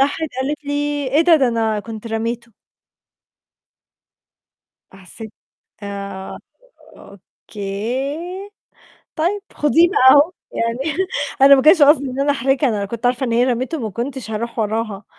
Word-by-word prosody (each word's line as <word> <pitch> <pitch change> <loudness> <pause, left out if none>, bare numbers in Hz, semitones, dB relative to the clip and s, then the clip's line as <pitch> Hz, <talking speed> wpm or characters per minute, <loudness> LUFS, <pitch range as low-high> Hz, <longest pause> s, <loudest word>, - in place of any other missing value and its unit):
راحت 285 +3 0
قالت 290 +2 -3
لي: 285 - -4 0.4
"إيه 285 +5 +2
ده؟ 335 -1 +5
ده 265 -4 +2
أنا 225 -2 -1
كنت 225 +1 -9
رميته." 230 +1 -4 2.4
حسّيت 195 +3 -11 0.5
آآ، 200 -1 -7 0.6
"أوكي، 250 - -6 0.7
طيب 355 +6 0
خديه 320 +4 +3
بقى 260 -9 +5
أهو." 290 +6 +5 0.2
يعني 230 +1 -2 0.6
أنا 280 0 +9
ما 265 - +2
كانش 315 +1 +6
قصدي 285 -1 +5
إن 260 +2 -4
أنا 285 - +2
أحرجها، 270 +1 +1
أنا 215 -3 -1
لو 200 - -3
كنت 235 +4 -4
عارفة 250 +1 0
إن 235 - -2
هي 240 +2 +3
رميته، 255 +5 -2
ما 220 -5 -4
كنتش 245 +2 -5
هاروح 230 +2 -5
وراها، 215 -2 -2
245 Hz, 140 wpm, -19 LUFS, 220-285 Hz, 2.4 s, أنا